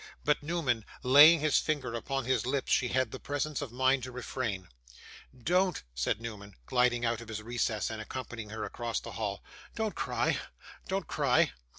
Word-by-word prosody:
But, 150 0 +2
Newman 145 -8 0 0.2
laying 145 +5 +8
his 155 -2 +4
finger 140 -6 -2
upon 135 +3 -2
his 130 -2 +1
lips, 135 0 -1
she 130 - +3
had 130 -2 0
the - - -6
presence 145 +2 -2
of 140 -5 -5
mind 130 +2 +2
to 125 +1 -6
refrain. 120 -6 -4 0.8
'Don't,' 180 +2 +2
said - - 0
Newman, 105 -3 -8
gliding 120 - +2
out 115 -1 0
of 115 - -10
his 110 -1 -5
recess, 115 -2 -1
and 110 -1 -5
accompanying 115 -2 -6
her 110 +1 -5
across 120 -1 -3
the - - -9
hall. 100 -3 -4 0.3
'Don't 220 -2 -1
cry, - - 0 0.5
don't 190 -1 -1
cry. - - +2
125 Hz, 175 wpm, -31 LUFS, 115-145 Hz, 0.8 s, laying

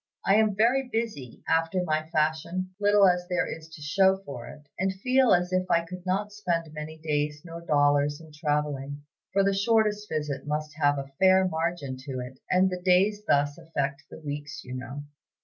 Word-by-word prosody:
I 195 - +4
am 215 -2 +3
very 245 +5 +2
busy, 215 - -4
after 165 +3 +1
my 155 -1 -1
fashion, 165 +4 -1
little 205 -1 +5
as 180 -1 +1
there 180 0 +1
is 160 0 -7
to 155 -2 -11
show 190 +5 +3
for 125 -4 -7
it, 150 - -11 0.2
and 190 +1 +1
feel 255 +6 +2
as 180 +1 +3
if 185 0 0
I 170 0 +3
could 180 +1 -9
not 200 +3 0
spend 170 -6 -2
many 155 +1 -7
days 150 -1 -2
nor 165 0 -8
dollars 145 -2 +2
in 160 -1 -14
traveling; 145 -2 -2 0.3
for 195 +1 +3
the 195 0 +2
shortest 210 0 +1
visit 150 -3 -3
must 150 0 -2
have 145 -1 +3
a 135 0 -6
fair 190 0 +5
margin 160 -5 -2
to 130 0 -6
it, 125 +1 -8
and 185 +1 +4
the 180 0 -4
days 190 +3 +3
thus 145 +2 +2
affect 140 -4 -3
the - - -10
weeks, 145 0 -6
you 125 - -8
know. 130 +3 -6
165 Hz, 190 wpm, -27 LUFS, 145-190 Hz, 0.3 s, little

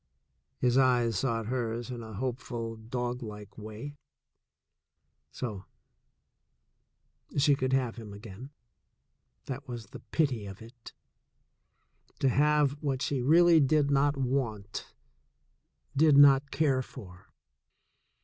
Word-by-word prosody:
His 125 +1 +2
eyes 120 -5 +3
sought 115 -4 -1
hers 120 0 -3
in 120 -1 -6
a 110 -1 -9
hopeful, 120 0 -4
doglike 115 -2 -5
way. 110 +7 -8 1.3
So 105 -7 -5 0.8
— - - -20
she 145 +1 +5
could 130 -1 -1
have 125 -4 0
him 110 -3 -9
again 105 +5 -10 0.5
— - - -49
that 135 +2 -6
was 120 -3 -6
the - - -9
pity 130 -10 -1
of 95 0 -9
it! 115 +1 -13 1.2
To 135 - +2
have 150 +1 +3
what 135 -4 -1
she 140 -3 -1
really 165 +5 +6
did 145 0 +3
not 140 +1 +2
want, 120 -6 -3 1.0
did 150 0 +5
not 140 0 +7
care 135 -2 +1
for! 90 -9 -12
125 Hz, 115 wpm, -29 LUFS, 115-140 Hz, 1.3 s, not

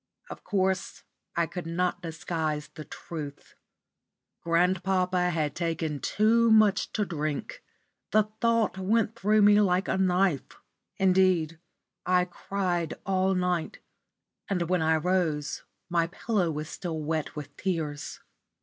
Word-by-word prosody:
Of - - -9
course 190 -2 -1 0.3
I 170 - +2
could 175 0 -6
not 180 +2 -1
disguise 160 -2 -3
the 155 - -10
truth. 150 -4 -8 0.9
Grandpapa 180 +1 +1
had 155 -4 -1
taken 165 -3 -2
too 230 +6 +3
much 215 -3 +4
to 210 - 0
drink. 155 - -4 0.5
The 215 - +4 0.2
thought 230 -5 +2
went 220 +3 +1
through 215 -1 +3
me 205 0 +6
like 185 -1 +2
a - - 0
knife. 185 -5 +1 0.4
Indeed, 185 -4 +3 0.4
I 180 0 +3
cried 180 -2 -2
all 190 0 +1
night, 180 -2 -1 0.7
and 185 -3 +1
when 180 -2 +2
I 160 0 +3
rose 160 -3 -1 0.2
my 170 -2 +1
pillow 190 0 -1
was 155 -1 -4
still 165 -2 -5
wet 155 0 -2
with 145 -1 -8
tears. 150 -6 -3
180 Hz, 125 wpm, -28 LUFS, 160-195 Hz, 0.9 s, me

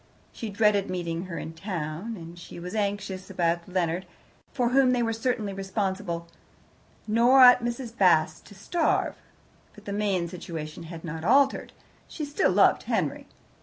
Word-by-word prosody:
She 225 - -6
dreaded 205 -1 +2
meeting 170 -1 -3
her 175 -2 -6
in 160 - -6
town. 170 +3 -5
And 170 0 -10
she 170 - -10
was 180 +1 -7
anxious 200 -3 -3
about 170 -1 -1
Leonard, 180 0 -1 0.4
for 245 -3 0
whom 260 0 +4
they 235 -2 +1
certainly 225 -3 -2
were - - -10
responsible. 190 -3 -3 0.8
Nor 235 +5 +5
ought 250 -1 +8
Mrs. 240 0 -4
Bast 160 -5 +3
to 205 - -14
starve. 325 - 0 0.6
But 210 - -15
the 200 - -4
main 200 -4 0
situation 165 -2 -7
had 165 0 -9
not 160 0 -5
altered. 270 +8 +3 0.4
She 305 - -5
still 290 +6 +1
loved - - +4
Henry. - - -1
195 Hz, 155 wpm, -26 LUFS, 170-230 Hz, 0.8 s, ought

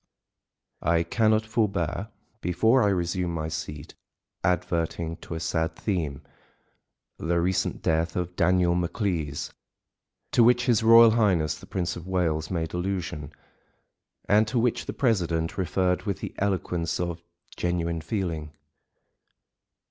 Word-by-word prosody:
I 85 +1 +2
cannot 110 +4 +2
forbear, 105 -4 -1 0.3
before 110 +9 +3
I 105 - +3
resume 90 -1 -1
my 80 -1 -3
seat, 75 -1 -6 0.5
adverting 85 -2 -1
to 80 - -8
a - - -3
sad 80 0 -1
theme 80 -8 -2 1.0
(the 85 +2 0
recent 90 +1 0
death 80 +1 +1
of 90 0 -3
Daniel 90 -1 +3
Maclise) 85 -4 -2 0.8
to 120 - +5
which 120 +1 +4
his 120 -4 +3
Royal 115 0 +8
Highness 95 -9 +2
the - - -13
Prince 90 -1 -2
of 85 +1 -9
Wales 80 -4 0
made 80 -3 -2
allusion, 90 -5 -3 1.0
and 105 +2 +4
to 120 +3 -2
which 120 0 +1
the - - -3
president 85 -10 0
referred 90 -1 0
with 100 -1 -1
the - - -6
eloquence 90 -4 -1
of 85 -1 -3 0.3
genuine 85 -2 -1
feeling. 80 -4 -3
90 Hz, 125 wpm, -26 LUFS, 80-100 Hz, 1.0 s, Royal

